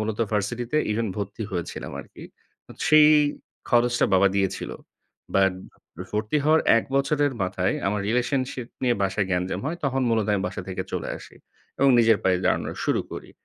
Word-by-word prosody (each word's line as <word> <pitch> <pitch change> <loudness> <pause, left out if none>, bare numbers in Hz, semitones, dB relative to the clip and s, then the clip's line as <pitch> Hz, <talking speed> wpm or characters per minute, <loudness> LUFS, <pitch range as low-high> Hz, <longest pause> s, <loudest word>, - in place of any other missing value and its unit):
মূলত 110 0 -3
ভার্সিটিতে 115 +6 -1
even 110 +2 0
ভর্তি 100 +2 -4
হয়েছিলাম 85 -2 -5
আরকি। - - -14 0.7
সেই 155 -1 +7 0.6
খরচটা 120 0 +3
বাবা 95 +1 +5
দিয়েছিল। 95 -1 -1 0.6
বাট 95 -1 +4 0.6
ভর্তি 105 +5 -1
হওয়ার 155 +1 +4 0.2
১ - - -3
বছরের 145 +1 +1
মাথায় 95 0 0
আমার 105 +1 0
relationship 125 +1 -1
নিয়ে 125 -2 +3
বাসায় 95 +1 0
গ্যাঞ্জাম 90 0 -1
হয়। 165 +3 -2
তখন 135 -1 0
মূলত 110 -3 +1
আমি 100 -2 0
বাসা 90 - -5
থেকে 95 0 -3
চলে - - -3
আসি। - - -14 0.4
এবং 140 - +4
নিজের 115 -2 +5
পায়ে 95 -1 +3
দাঁড়ানো - - +1 0.2
শুরু - - +2
করি। - - -8
110 Hz, 155 wpm, -24 LUFS, 95-130 Hz, 0.7 s, সেই